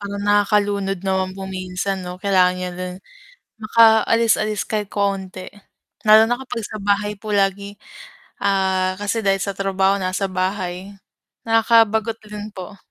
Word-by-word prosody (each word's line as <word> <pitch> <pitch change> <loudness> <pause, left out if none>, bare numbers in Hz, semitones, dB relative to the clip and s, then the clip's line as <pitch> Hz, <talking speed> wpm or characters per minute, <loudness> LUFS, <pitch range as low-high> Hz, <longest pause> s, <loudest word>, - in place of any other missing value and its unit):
Parang 200 0 -5
nakakalunod 205 -2 +1
naman 190 0 0
po 190 0 -8
minsan, 185 0 -4
'no? 180 0 -7
Kailangan 185 -2 +3
niya 180 - -3
din 180 0 -5 0.7
makaalis-alis 220 -1 +3
kahit 210 -2 -2
konti. 195 -2 -3 0.6
Lalo 215 +1 +8
na 245 - +2
kapag 245 -3 -6
sa 215 +1 -6
bahay 205 +1 0
po 215 0 -6
lagi, 200 0 0 0.7
ah, 190 -2 +1
kasi 205 +3 -1
dahil 195 -1 +2
sa 200 - -2
trabaho 195 0 +1
nasa 185 +1 -2
bahay, 185 0 -3 0.5
nakakabagot 225 0 +3
rin 210 0 -7
po. 190 +2 -9
200 Hz, 135 wpm, -20 LUFS, 190-210 Hz, 0.7 s, Lalo